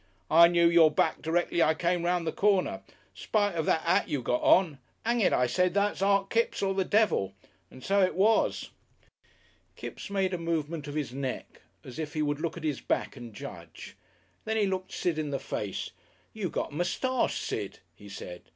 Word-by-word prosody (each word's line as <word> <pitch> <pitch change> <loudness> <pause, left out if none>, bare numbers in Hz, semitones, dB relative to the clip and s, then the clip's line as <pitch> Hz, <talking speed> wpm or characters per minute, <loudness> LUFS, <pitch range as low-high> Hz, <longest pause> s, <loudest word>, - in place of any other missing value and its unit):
"I 170 +2 +8
knew 170 0 +4
your 170 -2 +6
back 155 +1 0
directly 170 +1 0
I 160 0 +4
came 175 +1 0
'round 175 -1 0
the 160 - -1
corner. 190 - +1 0.3
Spite 205 -2 0
of 160 -2 -2
that 160 - +2
'at 180 +4 +2
you 140 -4 -2
got 125 - 0
on. 165 -7 +4 0.3
Hang 235 +1 +1
it, 195 - +3
I 125 - +3
said, 180 +9 +1
that's 205 -1 +1
Art 195 0 +2
Kipps 230 -2 0
or 195 0 +1
the 190 0 +1
devil. 200 - +1 0.4
And 130 - -14
so 200 +1 +2
it 185 - +1
was." 215 +4 +2 1.0
Kipps - - -8
made 195 -2 0
a 180 - -2
movement 165 -2 -3
of 145 - -6
his 145 -5 -3
neck 135 -1 -5 0.2
as 125 +2 -9
if 155 -1 -5
he 155 - +1
would 145 0 -1
look 165 0 -3
at 165 - -8
his 150 -3 -2
back - - -2
and 120 -3 -9
judge. 105 - -10 0.5
Then 220 0 -1
he 210 - +3
looked 190 -1 -3
Sid 165 -3 -1
in 150 -2 -2
the 140 - -1
face. 105 -6 -4 0.4
"You 210 -5 -3
got - - -3
a - - -10
moustache, 240 - 0
Sid," 100 -3 -4 0.2
he 100 +3 -14
said. 90 -3 -8
170 Hz, 200 wpm, -28 LUFS, 145-195 Hz, 1.0 s, I